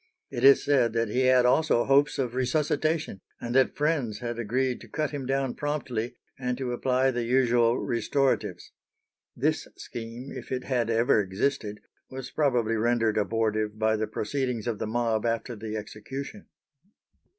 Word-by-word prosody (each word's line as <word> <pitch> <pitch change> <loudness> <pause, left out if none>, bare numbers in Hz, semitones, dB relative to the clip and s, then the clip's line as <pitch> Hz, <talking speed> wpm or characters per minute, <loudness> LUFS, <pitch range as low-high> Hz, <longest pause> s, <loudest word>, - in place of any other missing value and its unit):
It 120 - -4
is 135 0 +7
said 125 -6 +3
that 115 -1 0
he 130 +4 +1
had 130 -1 +5
also 125 -1 +3
hopes 140 +2 +3
of 125 -3 -1
resuscitation, 150 - 0 0.2
and 120 - -4
that 130 0 +3
friends 145 -8 0
had 120 0 -4
agreed 125 +3 -1
to 115 - -12
cut 155 +5 -2
him 140 -3 -5
down 135 -1 0
promptly, 130 -6 -3 0.2
and 125 -1 -2
to 130 -2 -3
apply 130 +2 +1
the 120 -1 -2
usual 120 -1 +3
restoratives. 130 +4 -1 0.6
This - - 0
scheme, 120 +3 -7
if - - -8
it 130 -1 -2
had 120 -4 0
ever 115 -1 +3
existed, 105 +2 -2 0.3
was 130 -1 -7
probably 120 -7 +1
rendered 115 -1 +2
abortive 110 0 0
by 110 0 +2
the 110 0 -1
proceedings 125 -1 -2
of 115 -3 -2
the - - -2
mob 115 -1 0
after 115 +1 -1
the 110 0 -5
execution. 135 - -7
120 Hz, 160 wpm, -27 LUFS, 115-135 Hz, 0.6 s, is